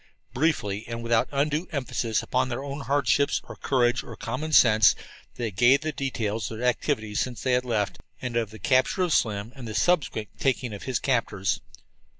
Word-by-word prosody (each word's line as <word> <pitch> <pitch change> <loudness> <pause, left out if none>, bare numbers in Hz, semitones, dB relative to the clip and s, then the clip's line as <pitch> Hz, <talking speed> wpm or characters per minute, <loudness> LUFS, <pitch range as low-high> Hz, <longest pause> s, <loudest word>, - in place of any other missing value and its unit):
Briefly, 115 -9 0
and 115 0 -5
without 115 -1 +2
undue 150 +4 0
emphasis 120 -6 -1
upon 130 0 0
their 125 +2 -3
own 140 +1 -5
hardships 140 0 +2
or - - -10
courage 125 -2 +1
or 115 - -9
common 130 +9 -4
sense, 110 -7 +6 0.4
they 115 -3 -3
gave 120 +8 +4
the 155 0 -2
details 115 -7 -2
of 110 - -6
their 120 - -3
activities 110 -2 0
since 125 -2 -3
they 130 - +1
had 125 0 +2
left, 110 -4 -1 0.2
and 125 -2 -4
of 115 -3 0
the 110 - -11
capture 130 - +2
of 175 -3 +1
Slim 105 +1 0
and 130 -3 -8
the 110 - -5
subsequent 150 - +1
taking 125 -4 0
of 100 - -7
his 130 -3 0
captors. 105 -8 0
120 Hz, 185 wpm, -26 LUFS, 110-140 Hz, 0.4 s, sense